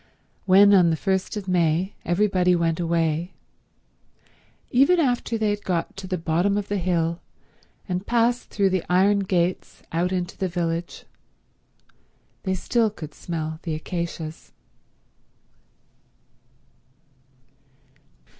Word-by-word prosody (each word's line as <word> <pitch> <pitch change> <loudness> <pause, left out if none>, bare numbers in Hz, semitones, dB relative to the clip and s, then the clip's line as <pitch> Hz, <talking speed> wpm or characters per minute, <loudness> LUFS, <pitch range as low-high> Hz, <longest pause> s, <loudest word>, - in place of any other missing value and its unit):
When, 200 +2 +7
on 180 -3 +6
the 160 - +2
first 190 +4 -1
of 200 -2 -6
May, 175 +1 +1
everybody 180 0 +2
went 165 -1 0
away, 165 +1 0 1.4
even 280 +8 +4
after 245 -5 0
they 215 -1 +1
had 205 0 -4
got 175 -3 -2
to 195 -1 -7
the 185 0 -2
bottom 175 +5 +1
of 205 -1 -3
the 205 -1 0
hill 170 -2 0 0.7
and 185 0 -3
passed 240 +1 +1
through 195 -2 +1
the 185 -2 0
iron 195 +3 +4
gates 185 -2 -1
out 175 +3 0
into 180 -1 -3
the 190 - 0
village 170 -1 -3 1.4
they 190 -1 -1
still 225 +4 +1
could 155 -7 -9
smell 160 -2 -5
the 160 -2 -3
acacias. 165 -1 -6
180 Hz, 115 wpm, -24 LUFS, 170-200 Hz, 1.4 s, When